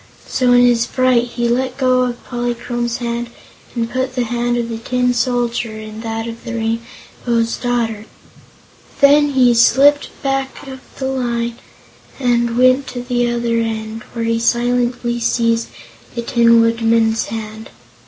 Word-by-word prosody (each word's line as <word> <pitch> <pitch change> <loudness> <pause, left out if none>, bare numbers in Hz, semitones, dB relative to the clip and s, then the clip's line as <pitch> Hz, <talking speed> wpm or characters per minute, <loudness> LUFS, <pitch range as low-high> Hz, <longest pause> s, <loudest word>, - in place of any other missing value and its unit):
So 255 -1 +1
in 245 0 +6
his 235 -1 +3
fright 255 -2 +2
he 240 0 -2
let 255 +2 -1
go 255 -2 +2
of 245 -1 -3
Polychrome's 240 -1 -3
hand 235 -1 -3 0.5
and 230 -1 -1
put 255 +1 -3
the 250 - +1
hand 240 +1 -1
of 235 -1 -1
the 230 -1 -5
Tin 250 +1 0
Soldier 240 -2 -1
in 215 0 -8
that 225 0 -4
of 230 0 -8
the 235 -1 -5
Rainbow's 230 0 -3
Daughter. 230 -3 -2 0.9
Then 290 +1 +5
he 250 -2 +5
slipped 275 +5 +4
back 270 0 -2
of 265 -1 -8 0.2
the 265 - -3
line 235 -3 -2 0.6
and 240 -2 +1
went 255 +2 +4
to 245 -1 -6
the 245 -1 0
other 235 -1 0
end, 220 0 -3
where 230 -1 -3
he 230 0 0
silently 240 0 0
seized 230 0 +1 0.5
the 235 - -3
Tin 235 -1 +4
Woodman's 230 -1 +2
hand. 220 0 -7
240 Hz, 150 wpm, -17 LUFS, 230-250 Hz, 0.9 s, in